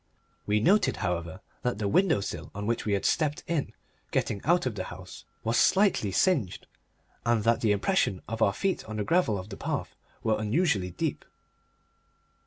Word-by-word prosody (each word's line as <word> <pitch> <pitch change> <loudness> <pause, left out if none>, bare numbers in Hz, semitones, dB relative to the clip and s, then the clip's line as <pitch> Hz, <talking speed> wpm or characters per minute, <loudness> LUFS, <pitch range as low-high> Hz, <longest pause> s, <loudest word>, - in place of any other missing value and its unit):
We 105 +1 +3
noted, 195 - +3
however, 85 0 -3 0.2
that 125 -3 -1
the 105 -1 -1
window 160 - +3
sill - - -5
on 100 +1 -4
which 115 +1 -1
we 105 - 0
had 100 - 0
stepped 150 -3 +1
in 165 -4 -1 0.4
getting 100 - -1
out 175 +1 +3
of 130 - -1
the 105 - -4
house 95 +1 -10 0.2
was 115 +1 +1
slightly 190 - +3
singed, 130 - +1 0.6
and 115 -2 +2
that 115 +1 +2
the 110 - +3
impressions 105 - +1
of 115 0 -5
our 100 - +5
feet 190 - -1
on 110 -1 -6
the 105 - 0
gravel 165 - +2
of 95 +2 -7
the 100 - -7
path - - -3 0.3
were 110 -1 +1
unusually 110 - +1
deep. 85 - -3
110 Hz, 180 wpm, -28 LUFS, 100-155 Hz, 0.6 s, our